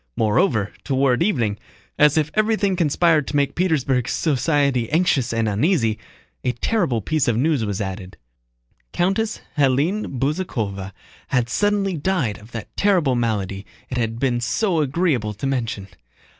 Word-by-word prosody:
Moreover, 110 - +1
toward 135 -1 +1
evening, 120 - +1 0.4
as 150 0 +5
if 150 -1 +1
everything 215 -3 +1
conspired 160 -2 +2
to - - -4
make 140 -1 +1
Petersburg 135 -8 +1
society 140 -4 +1
anxious 150 -6 +2
and 115 -1 0
uneasy, 115 - +1 0.4
a 125 - 0
terrible 135 - 0
piece 155 +3 0
of 115 -2 +2
news 145 -1 +1
was 100 -2 -2
added. 95 -2 -5 0.8
Countess 195 +5 0 0.2
Hélène 140 +5 +1
Bezúkhova 115 - -2 0.4
had 125 -3 0
suddenly 200 -1 +1
died 145 - -1
of 110 +3 -16
that 110 -2 -8
terrible 180 -10 +2
malady 105 -5 -1 0.3
it 125 - -2
had 115 -1 -1
been 120 -1 0
so 165 - 0
agreeable 135 - 0
to 105 - -5
mention. 115 -7 -2
135 Hz, 140 wpm, -21 LUFS, 115-170 Hz, 0.8 s, as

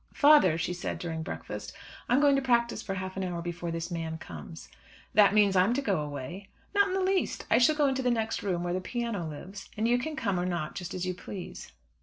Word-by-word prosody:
"Father," 285 - +6
she 175 +2 -1
said, 180 - -4
during 160 -2 -4
breakfast, - - -6 0.4
"I'm 245 - +4
going 285 -1 +5
to 275 - +2
practise 235 -3 +2
for 195 -3 -4
half 185 0 -5
an 190 - -1
hour 175 -2 -3
before 170 0 -4
this 165 +1 -4
man 165 -1 -3
comes." 80 - -9 0.5
"That 210 -1 +6
means 205 -2 +5
that 180 -1 +5
I'm 230 +6 +1
to 280 - 0
go 200 -9 +1
away." 150 +7 -6 0.2
"Not 405 -1 +4
in 375 - -2
the 385 - +1
least. 380 0 0
I 230 - +6
shall 280 +5 +5
go 300 -1 +3
into 265 -1 +1
the 250 - +1
next 225 -2 0
room 180 -4 -1
where 175 0 -1
the 185 - -1
piano 230 -5 -3
lives, 185 +7 -9
and 220 +2 +1
you 245 +1 +3
can 305 +5 -4
come 200 -9 0
or 180 - -1
not 170 -4 -2
just 180 -1 -6
as 185 0 -2
you 185 - -1
please. 180 0 -8
195 Hz, 245 wpm, -29 LUFS, 175-240 Hz, 0.5 s, Father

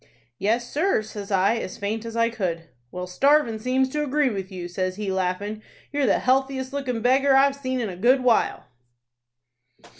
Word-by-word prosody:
"'Yes, 230 +4 0
sir,' 310 - +1
says 210 -2 -8
I, 200 +3 +2
as 185 - -5
faint 215 +3 -3
as 230 0 -6
I 230 0 +2
could. 170 -7 -3 0.2
"'Well, 180 +5 -5
starvin' 235 +4 +2
seems 255 +3 +1
to 300 +2 -2
agree 290 -1 +1
with 195 -2 -5
you,' 180 -2 -6
says 185 +1 -3
he, 205 -1 -3
laughin'. 190 +3 -2 0.3
'You're 285 -2 +1
the 200 - +4
healthiest 265 +1 0
lookin' 255 -5 -3
beggar 265 +2 +4
I've 275 +1 +4
seen 260 -2 -3
in 230 - -1
a 185 - -6
good 250 +7 +3
while.' 240 -3 +2
230 Hz, 180 wpm, -24 LUFS, 195-265 Hz, 0.3 s, the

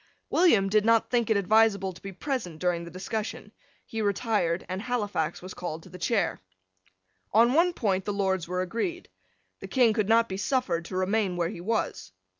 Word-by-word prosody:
William 275 - +4
did 210 +1 +3
not 230 0 +3
think 235 -3 +1
it 220 - +3
advisable 200 -1 +3
to 180 - -15
be 195 - -7
present 205 - -4
during 175 0 0
the - - -8
discussion. 205 +5 -5 0.3
He 225 - -4
retired; 200 -4 0
and 185 +1 -4
Halifax 205 -10 -2
was 185 - -7
called 160 -2 -6
to - - -14
the 180 - -11
chair. 215 -6 0 0.9
On 235 +4 +5
one 340 +4 +4
point 195 - -1
the 205 - -1
Lords 190 -4 0
were 180 +1 -1
agreed. 235 - -3 0.5
The - - -8
King 245 -4 +3
could 210 -1 0
not 230 +1 +5
be 190 - -4
suffered 195 - 0
to 185 - -5
remain 190 -1 0
where 170 -1 0
he 175 - -7
was. 220 - -2
200 Hz, 190 wpm, -27 LUFS, 185-225 Hz, 0.9 s, On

